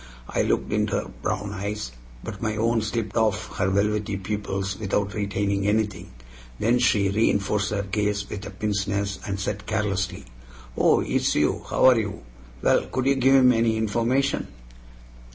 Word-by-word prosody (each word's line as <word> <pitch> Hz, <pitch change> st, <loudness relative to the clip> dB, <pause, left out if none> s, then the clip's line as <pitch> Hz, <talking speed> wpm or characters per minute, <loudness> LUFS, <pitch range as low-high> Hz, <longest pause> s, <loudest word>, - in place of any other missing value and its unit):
I -, -, 0 dB
looked -, -, 0 dB
into -, -, +1 dB
her -, -, -2 dB
brown 100 Hz, +1 st, -2 dB
eyes, 100 Hz, -, -4 dB, 0.3 s
but -, -, -7 dB
my 110 Hz, -1 st, -1 dB
own 115 Hz, +1 st, +1 dB
slipped 110 Hz, -1 st, -3 dB
off 110 Hz, -3 st, 0 dB
her 95 Hz, -1 st, +1 dB
velvety 100 Hz, +1 st, 0 dB
pupils 95 Hz, -1 st, -3 dB
without 100 Hz, -1 st, -1 dB
retaining 100 Hz, -1 st, -1 dB
anything. 105 Hz, -3 st, 0 dB, 0.5 s
Then 120 Hz, -, +2 dB
she 105 Hz, -5 st, +3 dB
reinforced 100 Hz, -1 st, +1 dB
her 100 Hz, -1 st, -1 dB
gaze 100 Hz, 0 st, -1 dB
with 100 Hz, -1 st, -6 dB
a -, -, -6 dB
pince 105 Hz, -2 st, -2 dB
nez, 100 Hz, -1 st, -2 dB
and 100 Hz, -1 st, -3 dB
said 100 Hz, 0 st, -4 dB
carelessly: 100 Hz, -4 st, -1 dB, 0.5 s
"Oh, -, -, +4 dB
it's -, -, 0 dB
you? 75 Hz, 0 st, +1 dB
How -, -, +2 dB
are 130 Hz, -3 st, +7 dB
you? 105 Hz, -, -4 dB, 0.4 s
Well, -, -, +3 dB
could 130 Hz, 0 st, -2 dB
you 135 Hz, -, +4 dB
give 135 Hz, 0 st, +4 dB
him 130 Hz, -1 st, +7 dB
any 115 Hz, -1 st, +2 dB
information?" 120 Hz, +5 st, 0 dB
105 Hz, 165 wpm, -25 LUFS, 100-110 Hz, 0.5 s, are